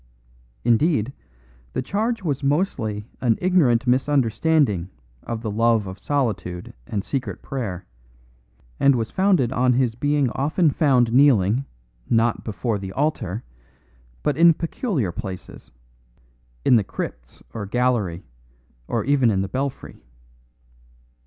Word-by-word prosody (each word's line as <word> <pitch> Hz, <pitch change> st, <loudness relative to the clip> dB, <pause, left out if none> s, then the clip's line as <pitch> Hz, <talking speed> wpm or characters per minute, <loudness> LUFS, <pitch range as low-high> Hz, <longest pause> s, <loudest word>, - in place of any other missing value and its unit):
Indeed, 120 Hz, 0 st, +2 dB, 0.6 s
the -, -, -2 dB
charge 220 Hz, -, -1 dB
was 145 Hz, -6 st, -1 dB
mostly 135 Hz, -, 0 dB, 0.2 s
an 115 Hz, -3 st, +2 dB
ignorant 145 Hz, -10 st, +3 dB
misunderstanding 130 Hz, -, +2 dB, 0.3 s
of 115 Hz, -1 st, -5 dB
the 110 Hz, -, -2 dB
love 115 Hz, 0 st, +2 dB
of 95 Hz, 0 st, -8 dB
solitude 100 Hz, -11 st, -2 dB
and 100 Hz, -2 st, -2 dB
secret 135 Hz, -2 st, -4 dB
prayer, 105 Hz, -10 st, -4 dB, 0.9 s
and 140 Hz, -1 st, +5 dB
was 115 Hz, -2 st, -2 dB
founded 185 Hz, -, +2 dB
on 125 Hz, -1 st, +2 dB
his 125 Hz, -2 st, +1 dB
being 145 Hz, +1 st, +1 dB
often 155 Hz, +4 st, +1 dB
found 130 Hz, -7 st, +3 dB
kneeling, 125 Hz, -3 st, +4 dB, 0.4 s
not 115 Hz, 0 st, +2 dB
before 110 Hz, 0 st, -2 dB
the 95 Hz, -1 st, -7 dB
altar, 120 Hz, -, -1 dB, 0.8 s
but 150 Hz, -2 st, 0 dB
in 170 Hz, 0 st, +6 dB
peculiar 165 Hz, -, -2 dB
places, 95 Hz, +1 st, -7 dB, 1.0 s
in 125 Hz, -, +6 dB
the 110 Hz, -, +2 dB
crypts -, -, -7 dB
or 105 Hz, -3 st, -5 dB
gallery, 110 Hz, -7 st, 0 dB, 0.6 s
or -, -, -1 dB
even 135 Hz, -3 st, +3 dB
in 95 Hz, -3 st, +1 dB
the -, -, -3 dB
belfry. 135 Hz, -, -4 dB
125 Hz, 120 wpm, -23 LUFS, 110-145 Hz, 1.0 s, in